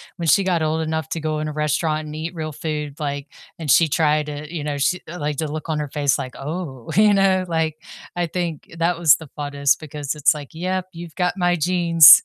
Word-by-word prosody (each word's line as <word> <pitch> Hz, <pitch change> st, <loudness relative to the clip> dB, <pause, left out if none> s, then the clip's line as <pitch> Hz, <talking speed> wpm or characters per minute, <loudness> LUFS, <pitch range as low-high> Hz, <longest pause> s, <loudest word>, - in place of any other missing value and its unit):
when 170 Hz, -2 st, -4 dB
she 195 Hz, -, +5 dB
got 175 Hz, -3 st, +1 dB
old 160 Hz, +1 st, 0 dB
enough 160 Hz, -1 st, -2 dB
to 165 Hz, -, -3 dB
go 155 Hz, 0 st, -2 dB
in 155 Hz, -, -2 dB
a -, -, -5 dB
restaurant 155 Hz, +1 st, 0 dB
and 150 Hz, -, -7 dB
eat 165 Hz, +3 st, -4 dB
real 155 Hz, -2 st, -5 dB
food, 150 Hz, -2 st, -4 dB
like, 145 Hz, -1 st, -3 dB, 0.3 s
and 155 Hz, -3 st, -5 dB
she 165 Hz, +5 st, +6 dB
tried 150 Hz, -1 st, +2 dB
it, 150 Hz, +1 st, -6 dB
you 160 Hz, -4 st, -4 dB
know, 145 Hz, -1 st, -2 dB
she 180 Hz, +6 st, +1 dB
like, 150 Hz, -4 st, -3 dB
the 155 Hz, -2 st, -2 dB
look 155 Hz, +1 st, -5 dB
on 155 Hz, -1 st, 0 dB
her 150 Hz, -2 st, -3 dB
face 145 Hz, -1 st, +1 dB
like, 130 Hz, -, -5 dB
"Oh," 140 Hz, -4 st, -6 dB
you 210 Hz, 0 st, +6 dB
know? 190 Hz, -1 st, +3 dB
Like, 160 Hz, -2 st, 0 dB, 0.4 s
I 175 Hz, -1 st, 0 dB
think 165 Hz, -2 st, -4 dB
that 170 Hz, +1 st, +1 dB
was 165 Hz, -4 st, +6 dB
the 160 Hz, -, -11 dB
funnest 145 Hz, -1 st, +1 dB
because 150 Hz, -1 st, -5 dB
it's 150 Hz, +1 st, +4 dB
like, 145 Hz, -2 st, -8 dB
"Yep, 185 Hz, +2 st, -2 dB
you've 170 Hz, -1 st, -9 dB
got 180 Hz, -1 st, +1 dB
my 175 Hz, -1 st, +2 dB
genes." 170 Hz, -2 st, +8 dB
155 Hz, 230 wpm, -22 LUFS, 150-170 Hz, 0.4 s, genes